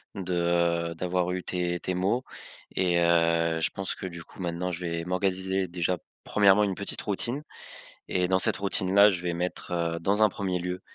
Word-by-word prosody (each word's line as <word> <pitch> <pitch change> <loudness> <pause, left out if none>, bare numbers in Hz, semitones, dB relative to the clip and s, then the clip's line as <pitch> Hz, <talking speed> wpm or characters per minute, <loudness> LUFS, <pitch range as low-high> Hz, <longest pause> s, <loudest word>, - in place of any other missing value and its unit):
de 85 -2 0
d'avoir 90 +1 -1
eu 90 0 -3
tes 90 -1 -2
tes 90 - -3
mots 100 +8 +1 0.5
et 90 -2 +2
heu, 85 -1 +3
je - - +2
pense 95 -1 -4
que - - -7
du 85 -2 -8
coup - - -18
maintenant 90 +1 -2
je 85 - -5
vais 85 -1 -3
m'organiser 95 0 0
déjà 90 +1 -1 0.3
1° 105 0 +4
une 100 -2 0
petite 100 - -4
routine 120 +7 -1 0.7
et 90 -1 +1
dans 95 +1 +3
cette - - +2
routine-là, 100 +1 +4
je 90 -4 -2
vais 90 -1 -2
mettre 90 +1 -4
heu, 85 -1 -1
dans 100 +5 +1
un 105 - +6
1er 95 -3 -2
lieu, 90 +1 -4
90 Hz, 185 wpm, -27 LUFS, 85-95 Hz, 0.7 s, un